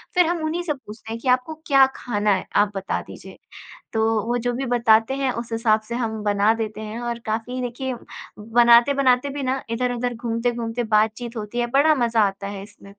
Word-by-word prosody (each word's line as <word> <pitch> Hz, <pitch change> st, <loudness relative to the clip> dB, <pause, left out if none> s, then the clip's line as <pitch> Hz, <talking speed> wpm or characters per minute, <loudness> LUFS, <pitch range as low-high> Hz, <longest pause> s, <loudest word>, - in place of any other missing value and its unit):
फ़िर 360 Hz, -, +5 dB
हम 335 Hz, -1 st, -1 dB
उन्हीं 330 Hz, +3 st, -1 dB
से 305 Hz, -4 st, -1 dB
पूछते 220 Hz, -4 st, -11 dB
हैं 230 Hz, -, -5 dB
कि -, -, -6 dB
आपको 255 Hz, +5 st, +2 dB
क्या 275 Hz, -2 st, +6 dB
ख़ाना 210 Hz, -3 st, -1 dB
है 185 Hz, -, -4 dB
आप 205 Hz, 0 st, +3 dB
बता 195 Hz, 0 st, -2 dB
दीजिए -, -, -12 dB, 0.6 s
तो 220 Hz, 0 st, +1 dB, 0.2 s
वो 240 Hz, +1 st, +1 dB
जो 245 Hz, +1 st, -1 dB
भी 265 Hz, +2 st, -3 dB
बताते 235 Hz, 0 st, +3 dB
हैं 270 Hz, -2 st, 0 dB
उस 235 Hz, -1 st, -6 dB
हिसाब 225 Hz, -1 st, +2 dB
से 235 Hz, +2 st, -6 dB
हम 220 Hz, -3 st, -3 dB
बना 205 Hz, +1 st, +3 dB
देते 220 Hz, -1 st, -4 dB
हैं। 215 Hz, +2 st, -6 dB
और 235 Hz, -1 st, -3 dB
काफ़ी 225 Hz, +4 st, -3 dB
देखिए, 250 Hz, +1 st, -3 dB, 0.5 s
बनाते-बनाते 245 Hz, +4 st, +4 dB
भी 280 Hz, 0 st, -5 dB
ना 260 Hz, +1 st, -1 dB
इधर-उधर 245 Hz, 0 st, -1 dB
घूमते-घूमते 235 Hz, 0 st, -2 dB
बात-चीत 220 Hz, +2 st, 0 dB
होती 215 Hz, +3 st, -4 dB
है 240 Hz, -, 0 dB
बड़ा 300 Hz, +3 st, +5 dB
मज़ा 235 Hz, -3 st, +2 dB
आता 195 Hz, 0 st, -6 dB
है 200 Hz, -1 st, -6 dB
इसमें। 205 Hz, -1 st, -16 dB
235 Hz, 200 wpm, -22 LUFS, 220-255 Hz, 0.6 s, क्या